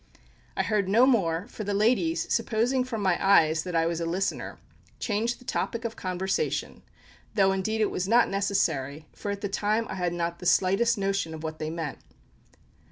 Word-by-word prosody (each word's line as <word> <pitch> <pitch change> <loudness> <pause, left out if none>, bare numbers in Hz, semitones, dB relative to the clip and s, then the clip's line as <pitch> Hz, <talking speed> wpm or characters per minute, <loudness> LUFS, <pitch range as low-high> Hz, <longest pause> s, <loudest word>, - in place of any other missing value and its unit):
I - - +2
heard 205 -3 0
no 230 +6 +6
more, 190 -9 +2
for 220 - -7
the 200 0 -2
ladies, 255 +11 +2
supposing 245 +3 +1
from 230 -5 -4
my 185 -2 +1
eyes 160 -5 +5
that 180 0 -5
I 165 0 +3
was 170 0 -1
a - - -1
listener, 190 +4 -2 0.4
changed 230 +2 -1
the 250 - -17
topic 230 -1 -2
of 225 - -3
conversation, 185 +1 -2 0.5
though 195 -3 +4
indeed 215 +3 -1
it 215 - +2
was 185 - -2
not 235 +3 +5
necessary, 160 -8 -1
for 205 - -6
at 200 0 -3
the 200 - -1
time 210 +3 0
I - - -4
had 180 -1 0
not 170 0 -3
the 180 - -3
slightest 205 +7 +3
notion 195 -4 -1
of 160 - -9
what 155 0 -5
they 155 - -3
meant. 160 -3 -5
195 Hz, 190 wpm, -27 LUFS, 170-220 Hz, 0.5 s, no